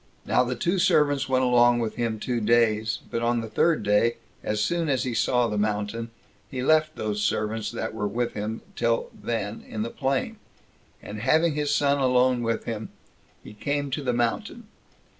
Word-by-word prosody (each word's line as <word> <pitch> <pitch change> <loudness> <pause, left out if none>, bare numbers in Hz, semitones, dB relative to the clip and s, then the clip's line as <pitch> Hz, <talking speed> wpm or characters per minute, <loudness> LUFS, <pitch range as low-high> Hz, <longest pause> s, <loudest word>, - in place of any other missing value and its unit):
Now 125 - +3
the 125 0 -2
two 175 +9 0
servants 145 -6 +3
went 130 0 +2
along 120 -1 +5
with 115 -2 -2
him 115 -2 -1
two 120 +1 -2
days; 110 -1 +2
but 115 - -1
on 120 0 +1
the 115 - -5
third 160 +4 +2
day, 105 +3 +3 0.3
as 105 0 -2
soon 165 +8 0
as 130 -3 +1
he 125 - -2
saw 125 +1 +2
the 105 -2 -2
mountain, 105 +2 -2 0.4
he 125 -1 -4
left 155 +2 +3
those 105 -1 -2
servants 105 +1 -1
that 115 -1 -4
were 105 -2 -2
with 115 +4 -2
him 105 +2 -4
till 115 0 0
then 110 -2 -4
in 110 -1 -3
the 115 - -4
plain, 135 0 -1 0.7
and, 105 +1 -7
having 155 +8 +3
his 150 0 -1
son 145 -1 +2
alone 125 -1 +3
with 115 -1 -1
him, 110 -1 -5 0.5
he - - -11
came 145 +5 -2
to 145 - -2
the 130 -3 0
mountain. 120 - -2
120 Hz, 185 wpm, -25 LUFS, 110-135 Hz, 0.7 s, along